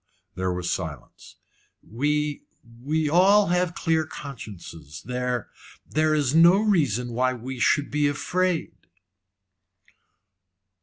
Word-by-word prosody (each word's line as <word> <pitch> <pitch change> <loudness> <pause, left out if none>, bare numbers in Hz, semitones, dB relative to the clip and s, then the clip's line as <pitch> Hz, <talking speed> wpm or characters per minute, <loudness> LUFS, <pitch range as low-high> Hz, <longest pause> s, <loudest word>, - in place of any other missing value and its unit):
There 95 0 -2
was 90 -1 -4
silence. 80 -8 -7 0.5
"We 150 +5 -1 0.4
we 155 +3 0
have 150 - -1
all 200 +3 +5 0.3
clear 160 -1 +1
consciences. 100 - -10
There 125 -1 -3 0.4
there 155 0 +1
is 145 -3 +1
no 170 +4 +6
reason 140 - +1
why 130 +2 +1
we 125 +2 -7
should 145 +4 +2
be 150 0 +2
afraid." 175 - -1
145 Hz, 105 wpm, -25 LUFS, 120-160 Hz, 0.5 s, no